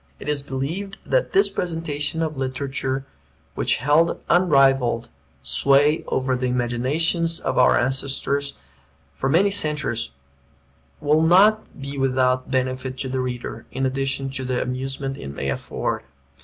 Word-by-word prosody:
It - - -9
is 150 -1 0
believed 150 +10 -4
that - - +1
this 390 +1 +4
presentation 160 -2 -2
of 155 -1 -3
a - - -7
literature 135 0 -2 0.5
which - - +1
held 150 +6 +2
unrivalled 135 -8 +3 0.3
sway 140 - +3
over 130 0 0
the 125 0 -1
imaginations 135 +8 +1
of - - -1
our 125 - +5
ancestors, 140 +2 -1 0.6
for 135 - -2
many 190 +7 +4
centuries, 150 - -1 0.9
will 150 +1 +3
not 195 +6 +4
be 140 0 -6
without 130 -1 +1
benefit 130 0 -2
to 130 - -4
the 130 0 -2
reader, 125 -1 -5
in 135 - -1
addition 135 0 -1
to 130 -1 -4
the 125 -1 -1
amusement 135 +1 -3
it - - -8
may 70 0 -4
afford. - - -3
135 Hz, 140 wpm, -23 LUFS, 130-155 Hz, 0.9 s, our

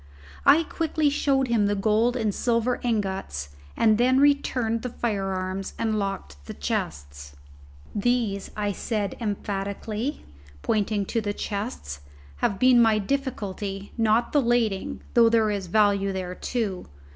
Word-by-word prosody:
I 320 +3 +7
quickly 315 -2 0
showed 275 -2 +1
him 225 -4 +2
the 205 - +1
gold 220 +4 +2
and 220 -4 0
silver 235 +2 0
ingots 195 - -2 0.3
and 220 -1 +4
then 255 +2 +4
returned 255 -5 +2
the 250 - -4
firearms 195 -4 -3
and 220 -2 0
locked 70 - -5
the - - -7
chests. 70 0 -4 0.6
"These," 215 -3 0 0.2
said 205 -1 -2
I - - -6
emphatically, 210 +5 -3 0.4
pointing 210 -1 0
to 230 - -1
the 205 -1 -2
cases, 200 - -4 0.4
"have 195 - 0
been 250 +1 +6
my 225 -2 +4
difficulty; 205 -5 -3
not 225 +1 +2
the 290 - +4
lading, 240 +1 0
though 230 -1 +6
there 225 -2 +3
is 200 -3 -3
value 200 0 +3
there 185 -1 -4
too. 205 -2 -3
215 Hz, 135 wpm, -25 LUFS, 195-240 Hz, 0.6 s, I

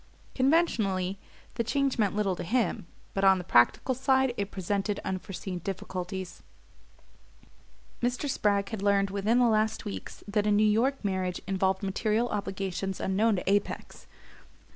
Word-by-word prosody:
Conventionally 215 - +1 0.3
the 235 - -1
change 275 +2 0
meant 205 -2 +2
little 200 -3 +1
to - - -6
him; 220 -2 0 0.3
but 195 - -1
on 190 -1 +6
the 180 - -5
practical 145 - +3
side 265 0 +2
it 200 -3 -3
presented 200 +2 -2
unforeseen 185 -1 -4
difficulties. 185 0 -5 1.6
Mr. 245 +4 -1
Spragg 200 -6 +1
had 220 -4 -5
learned 200 -1 +2
within 205 +4 +1
the 250 - +5
last 220 -1 +1
weeks 95 -2 -7
that 210 0 0
a - - +3
New 205 +1 +4
York 230 +4 +1
marriage 185 -2 -1
involved 190 0 0
material 215 +4 0
obligations 195 -2 -3
unknown 210 +3 +2
to 180 - -4
Apex. 200 +1 -1
200 Hz, 140 wpm, -28 LUFS, 190-225 Hz, 1.6 s, on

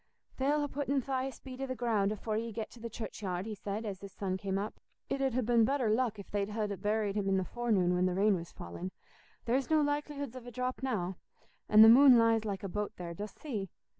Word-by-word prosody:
"They'll 290 +2 +2
ha' - - -19
putten 280 -1 0
Thias 265 -1 -3
Bede 260 -1 -8
i' - - 0
the 255 - -3
ground 220 -4 +1
afore 215 +1 -3
ye 230 +1 -2
get 220 0 -5
to 240 - -14
the 235 +1 -5
churchyard," 195 -4 -4
he 220 - -4
said, 205 +2 -4
as 195 -3 -5
his 200 -1 -9
son 190 -1 -3
came 190 0 -2
up. 205 +2 -4 0.3
"It 275 - 0
'ud 265 -3 +1
ha' 255 -3 +1
been 235 -1 +4
better 255 -2 +2
luck 225 -1 +1
if 200 - -10
they'd 205 0 -1
ha' 215 0 -1 0.2
buried 210 -1 0
him 200 -2 0
i' 190 - +3
the 190 - 0
forenoon 215 -7 +1
when 180 +1 +2
the 180 - -1
rain 205 +2 +4
was 170 -1 -6
fallin'; 85 - -7 0.6
there's 255 +3 +1
no 315 -1 +4
likelihoods 290 -3 -2
of 250 -1 -9
a - - -7
drop 250 +2 -3
now; 190 -9 -2 0.5
an' 215 +1 +9
the - - +10
moon 255 +2 +9
lies 225 -1 +3
like 200 -2 -3
a - - -2
boat 210 +3 -3
there, 170 -1 -5
dost 205 +5 -7
see? 215 - -4
220 Hz, 245 wpm, -32 LUFS, 200-255 Hz, 0.6 s, the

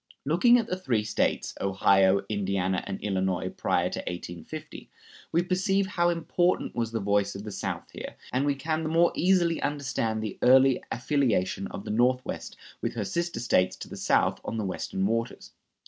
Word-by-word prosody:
Looking 180 - +5
at 235 - 0
the 185 - -3
three 125 - 0
States, 110 0 0
Ohio, 95 0 +3
Indiana, 95 -3 -1
and 95 - -4
Illinois, 95 -3 -1
prior - - 0
to - - -3
1850, 85 -1 -7 0.4
we 170 +2 +2
perceive 190 +2 +1
how 175 -3 +1
important 175 +1 0
was 115 -2 -2
the 115 - -1
voice 100 0 +1
of 100 - -6
the 105 - -6
South - - -5
here, - - -8 0.2
and 130 +2 +2
we 145 -1 +1
can 155 +3 -2
the 155 - -2
more 170 +2 +4
easily 175 -2 +2
understand 130 -6 -1
the 110 - -5
early 130 +1 +5
affiliation 115 -8 0
of 100 - -8
the - - -3
Northwest 125 +3 0 0.2
with - - -2
her 110 -3 -2
sister 170 - -2
States 95 -6 +2
to - - -9
the - - -8
south - - +1
on 115 - -4
the 110 - -2
Western 95 0 -2
waters. 115 +3 -2
120 Hz, 180 wpm, -27 LUFS, 100-165 Hz, 0.4 s, Looking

